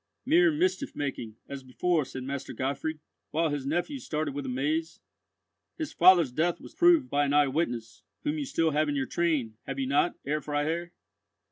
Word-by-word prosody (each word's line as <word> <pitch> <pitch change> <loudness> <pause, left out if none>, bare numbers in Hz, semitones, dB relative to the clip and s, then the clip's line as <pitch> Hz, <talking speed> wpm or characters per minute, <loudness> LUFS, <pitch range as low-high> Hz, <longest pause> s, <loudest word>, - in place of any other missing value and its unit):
'" - - -53
"Mere 330 +4 +5
mischief 310 -2 0
making, 125 -6 -4
as 140 -1 -6
before," 150 +5 0
said 130 0 -7
Master 135 +1 -5
Gottfried, 140 +4 -3 0.3
while 160 +1 +1
his 140 -2 -3
nephews 175 - -2
started 155 -2 -2
with 140 -1 -4
amaze. 150 +6 -1 0.8
"His 315 -3 -4
father's 175 -6 +6
death 165 +5 0
was - - -12
proved 345 -6 +5
by 145 - +1
an 140 - 0
eye 145 -1 +5
witness, 120 -6 -2 0.2
whom 300 +1 -1
you 290 - -2
still 165 -10 +1
have 150 +1 +1
in 145 - -1
your 135 -1 0
train, 145 -11 -1
have 135 - -4
you 135 - -1
not, 145 +6 +2
Herr 150 +2 -1
Freiherr?" 155 +4 -2
150 Hz, 190 wpm, -28 LUFS, 135-175 Hz, 0.8 s, father's